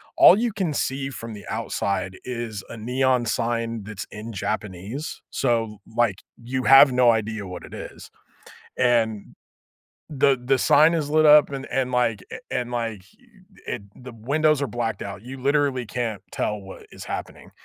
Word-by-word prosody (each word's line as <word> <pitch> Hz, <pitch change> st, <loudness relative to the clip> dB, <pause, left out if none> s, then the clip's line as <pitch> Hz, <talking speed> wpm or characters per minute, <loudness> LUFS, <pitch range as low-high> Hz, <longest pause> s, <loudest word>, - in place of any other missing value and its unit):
all 190 Hz, -, +8 dB
you 235 Hz, 0 st, 0 dB
can 190 Hz, -6 st, -2 dB
see 135 Hz, -1 st, -2 dB
from 115 Hz, -3 st, -7 dB
the 100 Hz, -1 st, -10 dB
outside 95 Hz, -1 st, -2 dB
is 120 Hz, -5 st, -4 dB
a -, -, -7 dB
neon 125 Hz, +2 st, +1 dB
sign 115 Hz, 0 st, -1 dB
that's 105 Hz, -1 st, -7 dB
in 110 Hz, +2 st, -8 dB
Japanese, 105 Hz, -, -4 dB
so, 115 Hz, -3 st, 0 dB, 0.2 s
like, 115 Hz, -5 st, +1 dB, 0.2 s
you 130 Hz, +2 st, -2 dB
have 135 Hz, 0 st, +8 dB
no 125 Hz, -1 st, +4 dB
idea 110 Hz, -2 st, -2 dB
what 90 Hz, -1 st, -8 dB
it -, -, -13 dB
is, -, -, -9 dB, 0.7 s
and 115 Hz, -4 st, +1 dB, 0.7 s
the 140 Hz, -2 st, +3 dB
the 135 Hz, +1 st, +2 dB
sign 155 Hz, +5 st, +5 dB
is 155 Hz, -3 st, -1 dB
lit 155 Hz, +1 st, +4 dB
up 150 Hz, -1 st, +7 dB
and 135 Hz, 0 st, -5 dB
and, 130 Hz, -1 st, -1 dB
like 115 Hz, -5 st, +1 dB, 0.3 s
and, 125 Hz, -1 st, -2 dB
like, 115 Hz, -5 st, -3 dB, 0.6 s
it -, -, -4 dB, 0.2 s
the 125 Hz, -1 st, -10 dB
windows 145 Hz, +6 st, +1 dB
are 140 Hz, -, 0 dB
blacked 120 Hz, -2 st, -3 dB
out, 100 Hz, 0 st, -7 dB
you 130 Hz, +2 st, -8 dB
literally 140 Hz, -2 st, +1 dB
can't 115 Hz, -2 st, -3 dB
tell 105 Hz, -1 st, -2 dB
what 95 Hz, 0 st, -11 dB
is -, -, -10 dB
happening, -, -, -7 dB
120 Hz, 165 wpm, -24 LUFS, 110-135 Hz, 0.7 s, all